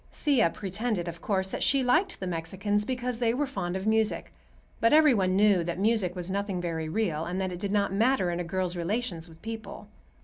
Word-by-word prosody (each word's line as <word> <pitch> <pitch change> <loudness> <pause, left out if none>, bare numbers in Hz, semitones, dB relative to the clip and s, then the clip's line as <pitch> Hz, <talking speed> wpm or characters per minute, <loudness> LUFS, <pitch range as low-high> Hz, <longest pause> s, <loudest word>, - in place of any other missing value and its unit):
Thea 265 - +2
pretended, 195 0 -3
of 170 0 -6
course, 190 -2 -1
that - - -4
she 275 -2 +3
liked 320 +10 +2
the 190 - -4
Mexicans 190 +4 -1
because 250 -1 -3
they 235 -1 +1
were 290 +3 0
fond 185 -10 -4
of 190 +1 -3
music; 220 0 +1 0.5
but 230 - +3
every 305 -3 +7
one 185 -4 +1
knew 200 -3 +4
that 170 0 -3
music 200 -3 +1
was 180 0 -5
nothing 200 -1 -2
very 165 -2 -3
real, 165 -5 -1
and 180 +2 -3
that 190 -1 -1
it 175 - -6
did 200 +1 -3
not 200 -1 +1
matter 220 -3 +2
in 170 - -3
a - - -1
girl's 180 +1 -2
relations 175 -1 -3
with 160 0 -16
people. 220 -2 -7
195 Hz, 215 wpm, -28 LUFS, 175-225 Hz, 0.5 s, every